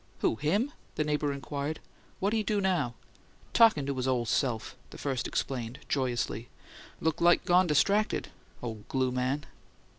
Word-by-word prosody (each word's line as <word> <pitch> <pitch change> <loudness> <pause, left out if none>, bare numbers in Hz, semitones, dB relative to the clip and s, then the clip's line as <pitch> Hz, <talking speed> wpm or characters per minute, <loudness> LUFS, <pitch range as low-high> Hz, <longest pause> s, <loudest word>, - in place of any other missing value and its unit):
"Who? - - +2
Him?" 200 - +1 0.2
the 155 - +1
neighbour 150 -1 0
inquired. 140 +2 -4 0.4
"What 200 +3 +1
he 225 - +2
do 210 0 0
now?" 175 -11 +1 0.6
"Talkin' 220 -12 +6
to 140 - -1
his 130 0 -1
ole 125 -2 +1
se'f!" 115 0 0
the - - -11
first 135 -4 -2
explained, 125 -2 -2
joyously. 120 -4 -1 0.5
"Look 160 0 0
like 175 0 +5
gone 180 +1 +5
distracted 200 +8 +2 0.3
ole 110 -3 -5
glue 130 -1 +1
man!" 130 +3 -1
140 Hz, 150 wpm, -30 LUFS, 125-175 Hz, 0.6 s, Talkin